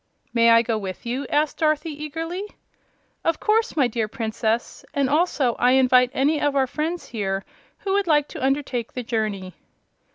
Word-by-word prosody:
"May 230 -1 +5
I 230 0 +6
go 225 -2 -1
with 190 0 -7
you?" 255 +3 -3
asked 295 0 +1
Dorothy, 310 0 +1
eagerly. 325 +5 -5 0.8
"Of 330 -1 +1
course, 440 -2 +1
my 270 -4 +4
dear 225 -2 -2
Princess; 225 +1 -2
and 280 -1 +1
I - - +2
also 300 -6 +2
invite 250 0 +5
any 290 +3 +2
of 290 -1 +1
our 270 -1 +3
friends 315 +6 -4
here 195 -4 -2 0.4
who 390 -2 -1
would 400 -1 +1
like 295 -2 +3
to - - -7
undertake 265 -4 -1
the 250 - -4
journey." 215 -5 -2
265 Hz, 170 wpm, -23 LUFS, 230-305 Hz, 0.8 s, I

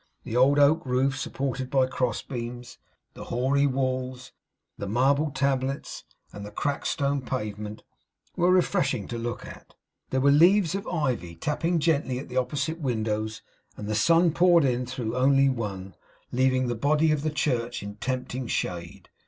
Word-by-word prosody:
The 115 - -5
old 135 +3 +5
oak 150 +4 +4
roof 130 +1 +1
supported 135 -1 -3
by 135 -1 +3
cross 125 -3 -2
beams, 120 0 -7 0.3
the - - -9
hoary 135 +4 +1
walls, 130 -1 -2 0.4
the 100 - -6
marble 135 +8 +2
tablets, 135 - -2 0.3
and 105 - -8
the 105 - -7
cracked 145 +5 -2
stone 140 0 0
pavement, 105 -4 -5 0.5
were 175 +1 +2
refreshing 175 - +2
to 120 - -4
look 120 +2 -4
at. - - -13 0.3
There 130 - 0
were 140 +2 +4
leaves 175 +4 +5
of 195 0 -4
ivy 130 - -2
tapping 160 - -1
gently 150 -5 +1
at 130 - -7
the 125 - -4
opposite 130 +5 -1
windows; 110 -5 -2 0.3
and 105 - -6
the 110 - -1
sun 165 +10 +4
poured 175 -2 +5
in 125 -1 0
through 115 -2 -4
only 135 +1 +4
one; 100 -7 -4 0.4
leaving 130 0 +2
the 120 - -1
body 150 +6 +2
of 150 -2 +1
the 155 - 0
church 125 -7 -1
in 100 +1 -8
tempting 130 +1 -3
shade. 85 -5 -4
130 Hz, 160 wpm, -26 LUFS, 120-145 Hz, 0.5 s, old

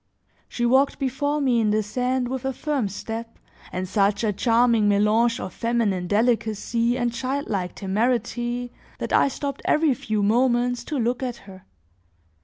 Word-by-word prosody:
She 240 - -2
walked 265 +3 +3
before 285 +2 -1
me 255 -4 +2
in 220 -2 +2
the 215 +1 +1
sand 250 +4 -1
with 260 0 -4
a 265 0 -1
firm 280 -4 -1
step 225 +3 -6 0.3
and 185 +1 -3
such 200 +2 +1
a 210 -2 +1
charming 230 -1 +3
melange 220 +4 +3
of 185 - -6
feminine 225 -6 0
delicacy 230 +2 +1
and 240 -2 -1
childlike 240 -8 -3
temerity, 240 +4 -1 0.3
that - - -4
I - - +5
stopped 280 0 -4
every 305 -2 +3
few 215 -3 -2
moments 245 +2 +2
to 300 - -3
look 240 +1 0
at 250 -2 -3
her. 190 -2 -13
235 Hz, 155 wpm, -24 LUFS, 210-255 Hz, 0.3 s, I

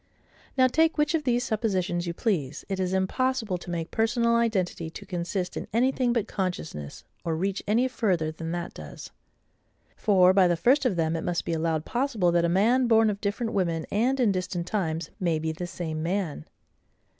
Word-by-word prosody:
Now, 260 - +6
take 320 +6 +3
which 300 +1 +2
of 315 -3 0
these 245 -1 +2
suppositions 185 -6 -1
you 170 - -2
please, 155 - -1
it 195 -1 -3
is 185 -1 0
impossible 210 +1 0
to 175 - -10
make 170 -1 -3
personal 235 +1 +2
identity 190 -8 0
to - - -10
consist 180 0 -3
in - - -5
anything 250 +1 +2
but 230 -3 0
consciousness; 80 - -4 0.2
or 165 -3 -1
reach 195 +4 -1
any 235 +5 +3
further 185 -11 0
than 165 +1 -6
that 175 0 -4
does. 75 -2 -10 0.8
For, 185 -3 +4
by 190 -2 +5
the 175 -1 +1
first 260 - +3
of 210 - -1
them, 165 -1 0
it 165 - -3
must 175 -1 -1
be - - -1
allowed 160 -1 -1
possible 235 -8 +1
that 170 0 +3
a - - +1
man 235 +8 +3
born 225 -2 +5
of 200 - -7
different 220 +3 -2
women, 170 -5 0
and 250 +6 +1
in 235 -5 +4
distant 185 -2 -2
times, 165 -5 -2
may 170 -3 +1
be 160 +1 -2
the 175 +3 -5
same 160 -3 -4
man. 170 - -2
185 Hz, 190 wpm, -27 LUFS, 170-230 Hz, 0.8 s, Now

